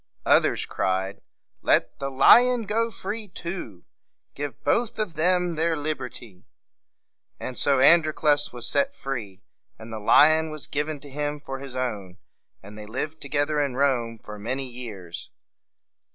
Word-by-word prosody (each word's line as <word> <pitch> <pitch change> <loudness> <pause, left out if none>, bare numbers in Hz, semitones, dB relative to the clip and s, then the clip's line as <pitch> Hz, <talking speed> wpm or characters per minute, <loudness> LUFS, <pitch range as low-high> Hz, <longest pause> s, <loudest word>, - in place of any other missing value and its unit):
Others - - +3
cried, 95 +1 -2 0.4
"Let - - +1
the 140 - -3
lion 240 - +6
go 225 +3 0
free 210 +1 -5
too! 170 - -7 0.5
Give 145 -1 -6
both 235 -1 +1
of 215 -6 -2
them 180 +1 +1
their 165 +1 0
liberty!" 125 -10 -6 0.9
And 130 - -6
so 140 +1 +3
Androclus 155 -1 +4
was 120 -1 -3
set 280 0 +1
free, 110 -8 -6 0.3
and 110 0 -10
the 110 - -5
lion 155 +9 +5
was 155 -2 -7
given 150 +1 -3
to 145 - -10
him 145 +1 -3
for 135 -2 -7
his 135 -2 -8
own. 105 -8 -4 0.5
And 105 +2 -11
they 105 - -9
lived 150 +7 -5
together 145 +1 0
in 140 -3 -2
Rome 125 -4 0
for 105 -1 -10
many 130 +5 -3
years. 110 -9 -8
140 Hz, 145 wpm, -25 LUFS, 115-160 Hz, 0.9 s, lion